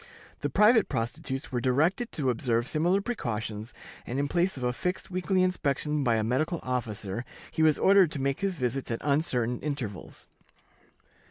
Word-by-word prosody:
The -, -, -2 dB
private 220 Hz, +1 st, +5 dB
prostitutes 125 Hz, +3 st, -3 dB
were 120 Hz, -2 st, -1 dB
directed 160 Hz, -, +1 dB
to 135 Hz, -5 st, +1 dB
observe 115 Hz, -1 st, 0 dB
similar 175 Hz, +7 st, +1 dB
precautions, 115 Hz, -, -4 dB, 0.3 s
and 125 Hz, -, -4 dB
in 140 Hz, +1 st, +1 dB
place 175 Hz, +2 st, +1 dB
of 130 Hz, -, -5 dB
a 125 Hz, 0 st, +1 dB
fixed 180 Hz, +8 st, -3 dB
weekly 185 Hz, +1 st, +1 dB
inspection 150 Hz, -4 st, 0 dB
by 120 Hz, -3 st, +3 dB
a 110 Hz, -, +1 dB
medical 145 Hz, +9 st, 0 dB
officer, 115 Hz, -4 st, -3 dB, 0.3 s
he -, -, -2 dB
was 155 Hz, -2 st, +5 dB
ordered 195 Hz, -3 st, +5 dB
to 145 Hz, -, -4 dB
make 135 Hz, 0 st, 0 dB
his 195 Hz, -3 st, -1 dB
visits 130 Hz, 0 st, -2 dB
at 115 Hz, -, -1 dB
uncertain 130 Hz, -5 st, +1 dB
intervals. 130 Hz, -10 st, -5 dB
140 Hz, 165 wpm, -28 LUFS, 120-175 Hz, 0.3 s, private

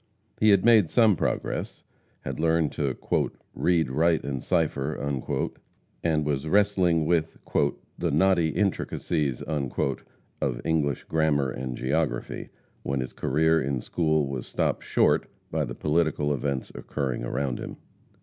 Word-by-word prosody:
He 110 Hz, -, +5 dB
had 100 Hz, 0 st, +5 dB
made 110 Hz, -8 st, +6 dB
some 110 Hz, -5 st, +5 dB
progress, -, -, -2 dB, 0.4 s
had -, -, -5 dB
learned 80 Hz, -1 st, +2 dB
to 70 Hz, -3 st, -2 dB, 0.6 s
"read, 85 Hz, -7 st, +1 dB
write 80 Hz, +4 st, +2 dB
and 70 Hz, -2 st, -3 dB
cipher," 75 Hz, -4 st, 0 dB
and 75 Hz, +3 st, -3 dB
was 70 Hz, 0 st, -1 dB
wrestling 95 Hz, -4 st, +3 dB
with 80 Hz, -1 st, +1 dB, 0.6 s
"the -, -, 0 dB
knotty 95 Hz, -4 st, +3 dB
intricacies" 80 Hz, -6 st, -1 dB
of 70 Hz, -3 st, -3 dB
English 75 Hz, -4 st, 0 dB
Grammar 75 Hz, -4 st, +1 dB
and 65 Hz, -1 st, -5 dB
Geography, 75 Hz, +4 st, -2 dB, 0.3 s
when 70 Hz, 0 st, -2 dB
his 65 Hz, -1 st, -4 dB
career 80 Hz, +4 st, +2 dB
in 70 Hz, -1 st, -1 dB
school 80 Hz, +1 st, +1 dB
was 65 Hz, -2 st, -5 dB
stopped -, -, -1 dB
short -, -, +2 dB, 0.2 s
by -, -, 0 dB
the -, -, -6 dB
political 75 Hz, -2 st, +1 dB
events 70 Hz, -1 st, -2 dB
occurring 65 Hz, -5 st, -3 dB
about 65 Hz, +1 st, -2 dB
him. -, -, -7 dB
75 Hz, 130 wpm, -26 LUFS, 70-85 Hz, 0.6 s, made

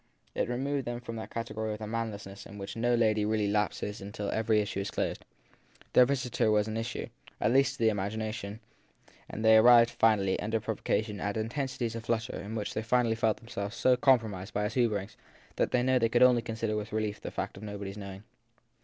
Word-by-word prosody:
It -, -, -1 dB
removed 135 Hz, +2 st, -1 dB
them 120 Hz, 0 st, -3 dB
from 120 Hz, -2 st, -7 dB
that 110 Hz, -, -6 dB
category 110 Hz, -1 st, -3 dB
of -, -, -5 dB
the 110 Hz, -, -6 dB
manless 110 Hz, -2 st, -3 dB
into 100 Hz, +1 st, -10 dB
which 100 Hz, 0 st, -6 dB
no 120 Hz, +1 st, +2 dB
lady 110 Hz, -2 st, +2 dB
really 105 Hz, -1 st, +1 dB
lapses 105 Hz, 0 st, -1 dB
till 105 Hz, -1 st, -3 dB
every 110 Hz, -1 st, +2 dB
issue 105 Hz, -1 st, -2 dB
is 100 Hz, +1 st, -3 dB
closed. -, -, -2 dB, 0.7 s
Their 125 Hz, -, +7 dB
visitor 125 Hz, -5 st, 0 dB
was 105 Hz, 0 st, +3 dB
an 110 Hz, -, -4 dB
issue 115 Hz, +1 st, -3 dB, 0.3 s
at 110 Hz, -, +2 dB
least 135 Hz, +1 st, +4 dB
to -, -, -13 dB
the 110 Hz, -, +6 dB
imagina 110 Hz, +1 st, -2 dB
tion, 105 Hz, 0 st, -7 dB, 0.7 s
and 110 Hz, -, -4 dB
they 110 Hz, 0 st, +8 dB
arrived 120 Hz, +1 st, +7 dB
finally, 100 Hz, -4 st, +2 dB
under 110 Hz, +2 st, -1 dB
provocation, 110 Hz, -1 st, -2 dB
at 105 Hz, +1 st, -2 dB
intensities 120 Hz, +1 st, -2 dB
of 115 Hz, -1 st, -6 dB
flutter 115 Hz, -1 st, -1 dB
in 105 Hz, +3 st, -6 dB
which 105 Hz, -2 st, -3 dB
they -, -, -2 dB
felt 115 Hz, -1 st, +1 dB
themselves 110 Hz, -2 st, -6 dB
so 130 Hz, +1 st, +4 dB
compromised 115 Hz, -8 st, +1 dB
by 105 Hz, -, +1 dB
his 105 Hz, +1 st, -2 dB
hoverings 110 Hz, -5 st, 0 dB, 0.4 s
that -, -, +2 dB
they 125 Hz, -2 st, +2 dB
could 120 Hz, +2 st, +4 dB
only 125 Hz, -2 st, +6 dB
consider 110 Hz, -1 st, -3 dB
with 105 Hz, 0 st, -4 dB
relief 110 Hz, -1 st, -2 dB
the -, -, -5 dB
fact -, -, -4 dB
of 95 Hz, -, -11 dB
nobody 100 Hz, -2 st, -5 dB
s 100 Hz, -, -11 dB
knowing. 100 Hz, -1 st, -8 dB
110 Hz, 205 wpm, -30 LUFS, 105-120 Hz, 0.7 s, they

